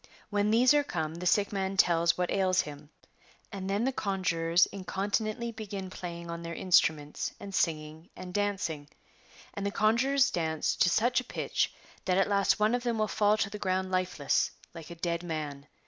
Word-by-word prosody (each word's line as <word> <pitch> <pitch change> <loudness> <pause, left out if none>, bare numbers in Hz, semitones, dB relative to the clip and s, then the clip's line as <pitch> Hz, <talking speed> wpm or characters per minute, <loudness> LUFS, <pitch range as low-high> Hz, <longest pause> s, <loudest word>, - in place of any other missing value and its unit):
When 205 0 +1
these 245 +5 +5
are 295 0 +4
come 160 - -3
the 175 +2 -4
sick 200 +3 +3
man 195 0 -2
tells 170 -2 +4
what 180 -1 -1
ails 185 -1 +2
him, 145 0 -10 0.6
and 195 -1 -5
then 200 +3 0
the 265 - +1
conjurors 180 -6 +1
incontinently 210 +4 -2
begin 200 -4 -6
playing 170 -2 -7
on 170 0 -5
their 170 0 -6
instruments 155 -5 +1
and 200 -1 -8
singing 160 -2 -1
and 180 -1 -8
dancing; 180 -8 -2 0.6
and 200 - -5
the 200 - 0
conjurors 260 +7 +3
dance 160 -2 -1
to 180 - +4
such 240 +7 +2
a - - -11
pitch - - -1 0.3
that 180 0 +2
at 195 - +3
last 200 0 +2
one 215 +2 +3
of 245 - +1
them 240 -2 -1
will 215 0 +1
fall 210 0 +2
to 200 - 0
the 210 - -6
ground 185 -1 -1
lifeless, 185 -6 +1 0.2
like 165 -2 -10
a 170 - -8
dead 170 0 -2
man. 150 -4 -5
190 Hz, 185 wpm, -29 LUFS, 170-205 Hz, 0.6 s, these